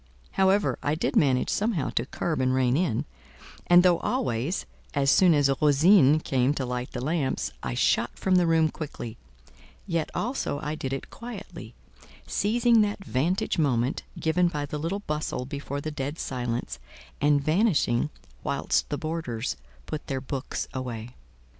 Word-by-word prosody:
However, 195 +1 +2
I 145 +1 0
did 155 - -1
manage 130 -4 +3
somehow 205 - 0
to 120 - -1
curb 155 -3 -2
and 130 0 +2
rein 130 -1 +2
in; 160 -8 0 0.6
and 175 0 +7
though 175 -2 +4
always, 185 - -1 0.3
as 140 0 +3
soon 180 -4 +6
as 145 -1 +4
Rosine 150 0 +6
came 130 +1 +1
to 135 - -2
light 125 0 -4
the 125 - -4
lamps, 145 - -1
I 60 - -3
shot - - +1
from 185 -1 +2
the 175 -1 +3
room 160 -1 +4
quickly, 120 -7 -7 0.7
yet 170 -4 -1
also 240 - -2
I 150 - -2
did 135 -4 -4
it 135 - -5
quietly; 230 -4 -9 0.5
seizing 230 +2 +3
that 205 -2 -1
vantage 165 +8 0
moment 130 -3 +1 0.2
given 175 +2 +2
by 150 -4 -2
the 150 +1 -5
little 175 +6 -2
bustle 150 -7 -3
before 140 +1 -5
the 155 - -4
dead 145 +1 -4
silence, 120 - -3 0.4
and 145 0 +4
vanishing 155 - +2 0.3
whilst - - 0
the 145 - -2
boarders 155 -8 -3 0.3
put 155 -1 -6
their 135 -1 -2
books 135 +1 -4
away. 120 -3 -5
150 Hz, 155 wpm, -27 LUFS, 130-175 Hz, 0.7 s, and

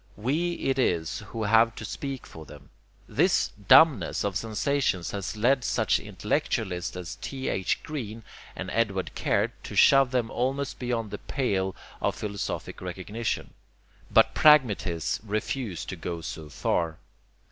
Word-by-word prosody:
We 150 +11 0
it 135 -5 -1
is 85 -10 0
who 115 - -4
have 115 +2 +4
to 110 - -6
speak 135 +4 -5
for 80 - -11
them. - - -14 0.4
This - - +2 0.2
dumbness 140 - +6
of 100 -2 -1
sensations 110 -3 0
has 100 +2 -4
led 125 +4 +3
such - - +2
intellectualists 90 -1 -2
as 90 -1 -6
T.H. 130 -9 -2
Green 115 -8 -6 0.3
and - - -5
Edward 100 -5 0
Caird - - +1
to - - -8
shove 135 -2 +6
them 125 -3 -1
almost 135 +3 -2
beyond 120 -4 -2
the 105 - -5
pale 95 -8 -1 0.3
of - - 0
philosophic 100 -2 -4
recognition, 95 +5 -4 0.6
but - - +5
pragmatists 105 - +4
refuse 110 -1 -3
to - - -5
go 85 0 -5
so 80 -1 -7
far. 80 +2 -1
110 Hz, 135 wpm, -27 LUFS, 95-130 Hz, 0.6 s, dumbness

